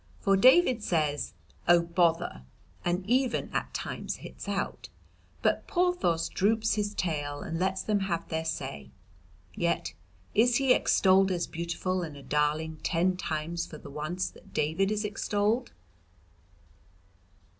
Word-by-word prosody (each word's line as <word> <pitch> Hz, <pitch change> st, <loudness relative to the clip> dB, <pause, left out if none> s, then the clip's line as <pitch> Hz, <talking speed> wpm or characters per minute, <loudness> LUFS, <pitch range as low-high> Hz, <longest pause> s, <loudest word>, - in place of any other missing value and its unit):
For 195 Hz, -1 st, +3 dB
David 255 Hz, -, +5 dB
says 155 Hz, -6 st, 0 dB, 0.3 s
'Oh, 175 Hz, 0 st, +7 dB
bother!' 170 Hz, -, +1 dB, 0.4 s
and 180 Hz, +2 st, -1 dB
even 255 Hz, +2 st, +1 dB
at -, -, -2 dB
times -, -, -4 dB
hits -, -, -10 dB
out, -, -, -3 dB, 0.5 s
but -, -, +1 dB
Porthos 350 Hz, -, +1 dB
droops 220 Hz, +3 st, +1 dB
his 205 Hz, -1 st, -1 dB
tail 145 Hz, -4 st, -2 dB
and 165 Hz, -, -4 dB
lets 190 Hz, +1 st, 0 dB
them 210 Hz, -1 st, +1 dB
have 175 Hz, -4 st, -2 dB
their 160 Hz, -1 st, -2 dB
say. 70 Hz, -, -4 dB, 0.6 s
Yet -, -, -1 dB, 0.4 s
is 240 Hz, +3 st, +4 dB
he 265 Hz, -1 st, +5 dB
extolled 190 Hz, -3 st, +4 dB
as 175 Hz, -2 st, 0 dB
beautiful 170 Hz, +2 st, -2 dB
and 155 Hz, -4 st, -6 dB
a 140 Hz, -, -11 dB
darling 150 Hz, +2 st, 0 dB
ten 180 Hz, +2 st, +1 dB
times 165 Hz, 0 st, -3 dB
for 155 Hz, -, -9 dB
the 145 Hz, -, -11 dB
once 155 Hz, +6 st, -2 dB
that -, -, -18 dB
David 160 Hz, +7 st, +1 dB
is 215 Hz, 0 st, -1 dB
extolled. 210 Hz, +3 st, 0 dB
180 Hz, 135 wpm, -29 LUFS, 160-210 Hz, 0.6 s, Oh